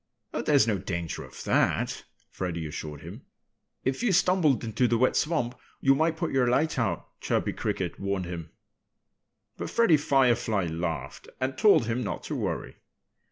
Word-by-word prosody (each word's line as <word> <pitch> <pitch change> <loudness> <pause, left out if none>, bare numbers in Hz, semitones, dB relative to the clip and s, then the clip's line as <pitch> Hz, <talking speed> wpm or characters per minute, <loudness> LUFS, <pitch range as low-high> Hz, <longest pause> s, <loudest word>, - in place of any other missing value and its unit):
"Oh, - - -1
there's 140 -6 +4
no 105 -4 0
danger 85 -3 -4
of - - -10
that!" - - +1 0.3
Freddie 85 -3 -3
assured 75 -1 -6
him. - - -9 0.6
"If 130 0 -1
you 240 -4 +2
stumbled 175 -7 +3
into 115 +2 +1
the 115 - +2
wet 130 +2 +3
swamp 150 -7 0 0.3
you 135 - +5
might 160 +3 +1
put 170 -1 -2
your 130 -2 +2
light 140 +3 +1
out," 100 -8 -1 0.2
Chirpy - - 0
Cricket - - -3
warned 100 -1 -2
him. 85 -2 -6 1.1
But - - -4
Freddie 230 -10 +4
Firefly 120 - +2
laughed 80 -5 -4
and 130 0 -1
told 200 - +5
him 115 +2 -1
not 105 - -4
to - - -4
worry. - - -3
120 Hz, 160 wpm, -27 LUFS, 90-145 Hz, 1.1 s, you